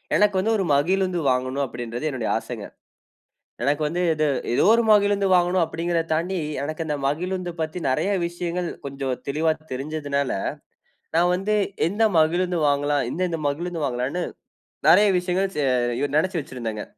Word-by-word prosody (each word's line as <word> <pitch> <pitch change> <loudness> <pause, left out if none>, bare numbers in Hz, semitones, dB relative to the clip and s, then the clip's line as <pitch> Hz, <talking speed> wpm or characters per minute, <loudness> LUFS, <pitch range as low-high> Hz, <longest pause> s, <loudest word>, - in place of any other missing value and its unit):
எனக்கு 210 -1 +3
வந்து 220 +4 +1
ஒரு 195 - 0
மகிழுந்து 185 +4 +1
வாங்கணும் 130 +2 0
அப்டின்றது 120 +2 -5
என்னுடைய 130 -6 -3
ஆசைங்க. 115 -2 -6 1.0
எனக்கு 145 +2 +1
வந்து 170 +4 -1
இது 155 0 0 0.3
ஏதோ - - +3
ஒரு 235 0 +4
மகிழுந்து 205 -1 +4
வாங்கணும் 180 0 +3
அப்டிங்கிறத 165 +1 -1
தாண்டி. 175 +4 -1 0.3
எனக்கு 155 +2 -3
இந்த 150 - 0
மகிழுந்து 180 +4 -2
பத்தி 160 +3 -3
நிறைய 160 +10 +1 0.2
விஷயங்கள் 175 0 -3 0.2
கொஞ்சம் 135 -2 -3
தெளிவா 155 +3 +2 0.2
தெரிஞ்சுதுனால, 140 0 -2 0.9
நான் 175 +1 +4
வந்து 200 +4 0 0.3
எந்த 205 +5 -1 0.2
மகிழுந்து 175 +2 +2
வாங்கலாம், 145 0 +1
எந்தெந்த 175 -2 -2
மகிழுந்து 165 +3 -3
வாங்கலானு 130 +7 -2 0.7
நிறைய 205 +5 +7
விஷயங்கள் 185 +2 0
ச - - -2 0.6
நினச்சு 175 +3 +1
வச்சிருந்தேங்க. 115 -6 -5
165 Hz, 140 wpm, -24 LUFS, 140-180 Hz, 1.0 s, நிறைய